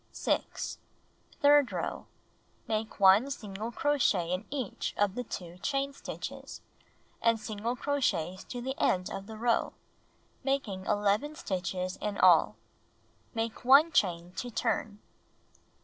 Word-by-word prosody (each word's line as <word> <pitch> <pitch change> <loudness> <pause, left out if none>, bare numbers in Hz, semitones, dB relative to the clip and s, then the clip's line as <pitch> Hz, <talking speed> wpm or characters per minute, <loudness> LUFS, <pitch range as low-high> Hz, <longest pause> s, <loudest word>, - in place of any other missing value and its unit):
6. - - -2 0.6
Third 290 -2 +6
row: - - -4 0.6
Make 220 -1 -2
1 200 +7 +6
single 215 -3 -5
crochet 240 -12 +1
in 185 +4 -2
each 265 -7 -3
of 205 -2 +2
the 250 - -3
two 175 -5 -7
chain 275 +5 -1
stitches, - - -7 0.6
and 230 -1 +3
single 215 +3 -3
crochets 210 - -1
to 245 - -6
the 265 +2 -2
end 180 0 +1
of 195 0 -6
the 220 -1 -8
row, 235 +1 +1 0.7
making 245 -9 -2
II 210 +8 +1
stitches 185 - -3
in 210 -1 -3
all. 170 - +5 0.8
Make 225 0 -3
1 280 +6 +7
chain 175 - +1
to 245 - -3
turn. 220 -2 -2
220 Hz, 125 wpm, -30 LUFS, 190-255 Hz, 0.8 s, 1